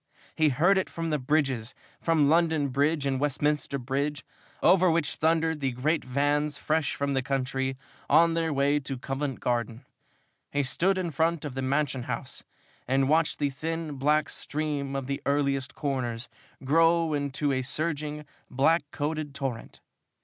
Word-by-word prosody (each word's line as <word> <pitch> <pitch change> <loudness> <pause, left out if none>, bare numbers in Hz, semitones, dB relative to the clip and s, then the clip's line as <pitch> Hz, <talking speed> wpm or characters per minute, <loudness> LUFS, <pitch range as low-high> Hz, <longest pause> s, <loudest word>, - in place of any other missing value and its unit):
He 155 -1 +3
heard 175 +9 +3
it 190 - -3
from 165 -1 -3
the 150 - +1
bridges, 130 -4 0 0.2
from 160 -3 +3
London 160 -2 +3
Bridge 145 +3 +1
and 135 -1 0
Westminster 145 0 0
Bridge, 140 +3 -2 0.4
over 185 +1 +5
which 165 -2 +1
thundered 160 0 +1
the 135 -3 -1
great 150 +6 0
vans 145 +3 0
fresh 155 +1 0
from 140 0 -1
the 135 - +1
country, 135 0 -2 0.3
on 165 0 +5
their 165 -1 0
way 140 +1 +2
to 135 -1 -5
Covent 135 +2 -4
Garden. 120 +1 -2 0.7
He 145 0 +1
stood 185 +8 +1
in 180 -3 -2
front 160 +1 0
of 145 - -5
the 135 - -3
Mansion 135 -1 0
House - - -5 0.4
and 135 +1 +2
watched 160 +1 +2
the 145 -1 0
thin, 160 +3 -4
black 150 +3 +2
stream 145 -2 -3
of 135 -1 -2
the 140 +1 -3
earliest 140 -2 0
corners 130 -5 -2 0.4
grow 165 +3 +3
into 145 0 -1
a 130 -1 0
surging, 150 +2 -2 0.2
black 155 +6 +3
coated 150 -1 -3
torrent. 135 -5 -5
145 Hz, 155 wpm, -27 LUFS, 135-160 Hz, 0.7 s, over